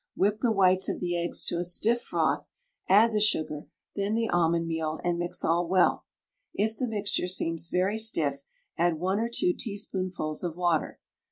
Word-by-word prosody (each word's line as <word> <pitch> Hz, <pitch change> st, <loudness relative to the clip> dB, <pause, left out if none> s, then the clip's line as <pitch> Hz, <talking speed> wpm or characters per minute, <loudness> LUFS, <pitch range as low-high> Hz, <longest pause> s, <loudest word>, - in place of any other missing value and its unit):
Whip 205 Hz, +2 st, +1 dB
the 240 Hz, -, +2 dB
whites 190 Hz, -2 st, +3 dB
of -, -, -3 dB
the 175 Hz, -1 st, -2 dB
eggs 170 Hz, 0 st, -2 dB
to 170 Hz, -, -1 dB
a -, -, 0 dB
stiff 220 Hz, +7 st, +1 dB
froth, -, -, -1 dB, 0.4 s
add 215 Hz, +4 st, +6 dB
the 210 Hz, -, +2 dB
sugar, 155 Hz, -7 st, 0 dB, 0.3 s
then 200 Hz, +2 st, -1 dB
the 230 Hz, 0 st, 0 dB
almond 170 Hz, -1 st, +2 dB
meal, 160 Hz, -1 st, -2 dB
and 175 Hz, -1 st, 0 dB
mix 175 Hz, 0 st, -2 dB
all 170 Hz, +1 st, +2 dB
well; 185 Hz, +1 st, +2 dB, 0.5 s
if 220 Hz, +2 st, 0 dB
the 255 Hz, -, -2 dB
mixture 205 Hz, -4 st, -1 dB
seems 165 Hz, -2 st, -2 dB
very 190 Hz, +4 st, +1 dB
stiff 150 Hz, -11 st, 0 dB, 0.4 s
add 170 Hz, -1 st, +2 dB
one 190 Hz, +4 st, 0 dB
or 230 Hz, +1 st, -1 dB
two 355 Hz, +9 st, +2 dB
teaspoonfuls 185 Hz, -, -3 dB
of 170 Hz, -3 st, -3 dB
water. 175 Hz, -3 st, 0 dB
180 Hz, 180 wpm, -28 LUFS, 170-210 Hz, 0.5 s, add